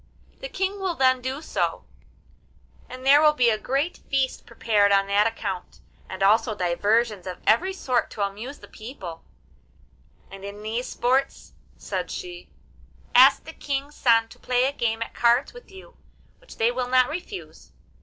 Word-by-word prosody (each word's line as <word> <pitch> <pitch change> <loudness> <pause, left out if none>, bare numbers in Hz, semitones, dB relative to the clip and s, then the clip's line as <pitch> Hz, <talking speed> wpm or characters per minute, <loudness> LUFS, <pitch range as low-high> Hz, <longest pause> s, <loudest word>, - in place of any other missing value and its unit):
The - - -7
King 385 -2 -2
will 375 -3 -2
then 260 -2 +3
do 265 +4 -4
so, - - -2 1.1
and 255 +1 -9
there 285 +2 +7
will 305 -1 +5
be 245 -5 +3
a 215 - 0
great 275 +9 -2
feast 270 -1 -1
prepared 210 -3 +2
on 195 0 +4
that 200 +2 +3
account, 200 -5 -5 0.3
and 190 +1 -4
also 215 +2 +3
diversions 205 +3 0
of 180 - -5
every 350 - +3
sort 255 -10 -1
to 205 - -3
amuse 220 +8 -7
the - - -14
people; 195 -8 -9 1.1
and 195 0 -11
in 200 +1 -8
these 230 +3 -3
sports,' 260 +3 -1 0.2
said - - -4
she, 355 -2 -8 0.6
'ask 270 +3 +7
the 320 - -10
King's 280 0 -4
sons 225 -4 +2
to - - -15
play 250 0 +1
a 270 - +1
game 230 -4 -1
at - - -12
cards 240 +3 +2
with 485 0 -14
you, 380 -1 -14 0.4
which - - -15
they 230 +2 +2
will 250 0 -2
not 255 0 +4
refuse. 360 +5 -8
245 Hz, 165 wpm, -24 LUFS, 215-280 Hz, 1.1 s, there